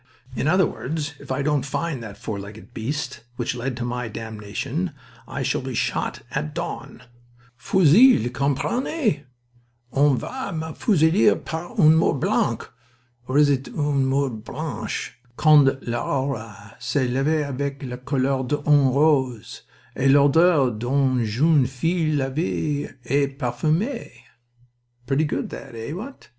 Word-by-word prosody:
In - - -1
other 185 +3 +4
words, 150 +1 -4
if - - -9
I 135 +2 0
don't 150 -1 +1
find 140 -1 -3
that 105 -3 -9
four 105 -3 -5
legged 105 +4 -11
beast 130 +1 -4
which 120 0 -2
led 125 +1 -4
to 120 - -3
my 125 0 -3
damnation 115 - -4 0.3
I - - -4
shall - - 0
be - - -5
shot - - -2
at 75 0 -3
dawn. - - -6 0.5
Fusille, 165 - +5
comprenez? 150 - 0 0.7
On 140 -1 +4
va 260 - -5
me 160 0 -4
fusiller 185 +1 +3
par 175 +8 -6
un 155 -4 +7
mur 160 - +3
blanc 115 -3 0 0.6
or 130 - 0
is 150 0 +6
it 135 -2 0
une 140 -1 0
mure 135 0 +1
blanche? 125 +3 -5 0.2
quand 155 -2 +6 0.2
l'aurore 115 -4 -3
se 135 -3 0
leve 140 +5 +1
avec 140 +1 -4
les 125 -2 -5
couleurs 130 0 0
d'une 145 0 +3
rose 130 -5 +1 0.3
et 135 - +2
l'odeur 145 0 +5
d'une 125 +2 +1
jeune 135 +5 +3
fille 155 +4 0
lavee 145 +1 -1 0.2
et 140 +2 +2
parfumee. 155 - -1 1.0
Pretty 140 +4 +1
good 150 - -3
that, 130 -3 -9
eh, 115 +6 -5
what? 230 +11 -9
140 Hz, 135 wpm, -23 LUFS, 125-155 Hz, 1.0 s, un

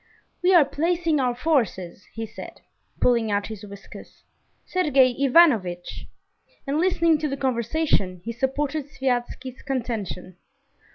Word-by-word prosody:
"We 365 +1 +3
are 320 -5 +7
placing 330 +2 0
our 250 -2 0
forces," 230 - -1
he 225 0 -4
said, - - -11 0.4
pulling 235 -3 +2
out 205 0 0
his 215 -3 -7
whiskers, 200 -1 -12 0.4
"Sergey 275 -8 +3
Ivanovitch!" 245 - +2 0.6
And 285 +2 -1
listening 335 -3 +3
to 305 - -1
the 275 - -3
conversation, 235 - 0
he 230 - -3
supported 275 +4 -2
Sviazhsky's 260 -1 -3
contention. 225 -9 -4
260 Hz, 120 wpm, -24 LUFS, 225-300 Hz, 0.6 s, are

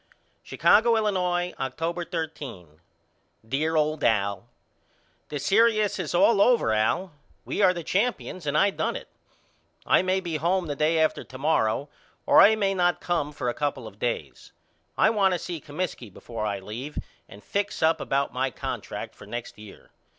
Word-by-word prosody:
Chicago, 235 -1 +4
Illinois, 180 -5 0
October 165 +6 -3
13. 140 - -6 0.7
DEAR 155 +6 0
OLD 155 0 0
AL: 100 -2 +1 0.8
The 150 - -3
serious 215 +6 +2
is 175 -2 -3
all 200 +3 +5
over 230 - +4
Al. 140 - 0 0.3
We - - -2
are 190 -2 +6
the 175 -2 -5
champions 185 -3 -1
and 145 +1 +1
I 200 +5 +4
done - - -2
it. - - -8 0.8
I - - +4
may 185 +1 +1
be 170 -4 -3
home 175 +4 +1
the 145 -3 -3
day 155 +3 +2
after 160 -1 +1
to 130 - -11
morrow 135 -3 +1 0.4
or - - +7
I 220 +2 +7
may 200 -2 +1
not 175 -2 +1
come 165 -4 -1
for 145 -4 -4
a 120 - 0
couple 140 -4 -3
of 105 -1 -11
days. 120 0 -4 0.5
I - - +4
want 195 -4 +3
to - - -1
see 170 -3 -6
Comiskey 145 - -5
before 110 +2 -5
I 100 -1 -2
leave 110 +10 -7 0.3
and 100 +2 -13
fix 200 -4 -2
up 160 +1 +3
about 140 +1 -1
my 130 +1 0
contract 120 - -6
for 100 - -14
next 120 -1 -7
year. 105 -2 -14
160 Hz, 170 wpm, -26 LUFS, 125-185 Hz, 0.8 s, or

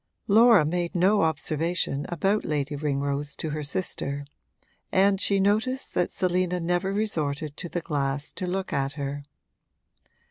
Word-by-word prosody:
Laura 220 -4 +6
made 175 +2 -2
no 195 +4 +4
observation 160 -1 0
about 195 +5 +1
Lady 145 -1 -2
Ringrose 140 0 -2
to 160 - -4
her 155 0 -3
sister, 145 -2 -3 0.7
and 195 +1 +3
she 200 -1 +3
noticed 220 +7 +1
that 175 - +1
Selina 180 -1 0
never 175 +3 0
resorted 155 -8 -2
to 175 - -6
the 175 - -3
glass 140 -2 -2
to 185 - -4
look 190 +1 -2
at 135 0 0
her. 140 0 -5
170 Hz, 140 wpm, -26 LUFS, 145-190 Hz, 0.7 s, Laura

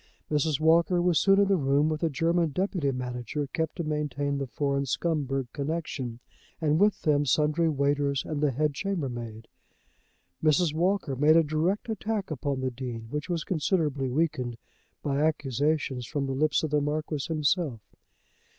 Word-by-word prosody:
Mrs. 150 -1 +1
Walker 165 +3 +4
was 175 -2 +3
soon 195 0 +4
in 200 - +4
the 195 - +3
room, 140 0 +2
with 155 -1 -2
a 165 - +2
German 165 +3 +1
deputy 175 -2 -1
manager 125 +2 -3
kept 160 +3 -3
to 170 - -3
maintain 145 -2 -2
the 140 - -3
foreign 140 +2 -1
Scumberg 135 -2 -1
connection, 140 -5 -3 0.4
and 155 -1 +2
with 205 +1 +3
them 145 -2 +3
sundry 150 +4 +2
waiters 140 -1 0
and 150 -2 -3
the 150 - +3
head 145 +3 0
chambermaid. 125 - -4 1.0
Mrs. 155 +1 +3
Walker 175 -3 0
made 150 +4 +5
a 165 - +5
direct 160 +9 0
attack 215 -3 -3
upon 140 -2 -2
the 130 0 -1
Dean, 120 -3 -6
which 150 +3 -4
was 170 -3 -1
considerably 150 -6 0
weakened 130 -4 -1 0.5
by 140 -1 0
accusations 145 -3 0
from 145 0 -2
the 135 - -2
lips 150 +3 +1
of 155 - -2
the 150 -1 +2
Marquis 150 0 -2
himself. 155 - 0
150 Hz, 160 wpm, -28 LUFS, 135-165 Hz, 1.0 s, made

